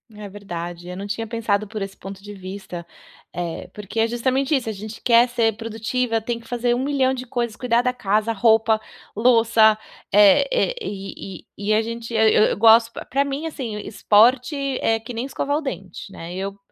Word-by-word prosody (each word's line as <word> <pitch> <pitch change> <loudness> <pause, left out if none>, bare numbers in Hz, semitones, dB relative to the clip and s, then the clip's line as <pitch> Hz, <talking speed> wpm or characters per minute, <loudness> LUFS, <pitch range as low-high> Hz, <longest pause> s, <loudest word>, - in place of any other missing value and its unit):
É 210 -1 -8
verdade, 175 -3 -7
eu 180 - -6
não 195 +2 -6
tinha 225 +2 -4
pensado 215 -2 -1
por 215 0 -6
esse 195 0 -6
ponto 195 0 -9
de 205 0 -9
vista. 185 -2 -8 0.5
Eh, 175 -2 -4
porque 210 +1 -6
é 225 - +3
justamente 260 +5 0
isso. 250 -5 -1
A - - -1
gente 215 +2 -8
quer 235 0 +5
ser 230 -3 0
produtiva, 225 +1 -2
tem 235 +1 -3
que 230 - -17
fazer 240 0 0
1.000.000 265 +1 +1
de 255 -1 -5
coisas, 235 -2 -3
cuidar 240 -1 +2
da 250 0 +1
casa, 215 -2 0
roupa, 220 0 +3 0.3
louça, 225 -1 +4 0.4
eh 205 - +6
eh, - - +1
e 195 - -7 0.2
e 200 - -6
e - - +5
a 215 - +3
gente 230 +1 -6
eu 220 -1 +3
eu 215 - +4
eu - - 0
gosto 225 +2 +6 0.2
pra 275 +2 +1
mim, 280 +3 -3
assim, 255 -8 -5
esporte 240 +6 +3 0.3
é 225 - +2
que 225 +2 -9
nem 235 +2 -3
escovar 280 +1 -2
o - - -3
dente, 195 - -7
né? 170 -2 -9
Eu 195 +2 -5
225 Hz, 195 wpm, -22 LUFS, 200-245 Hz, 0.5 s, eh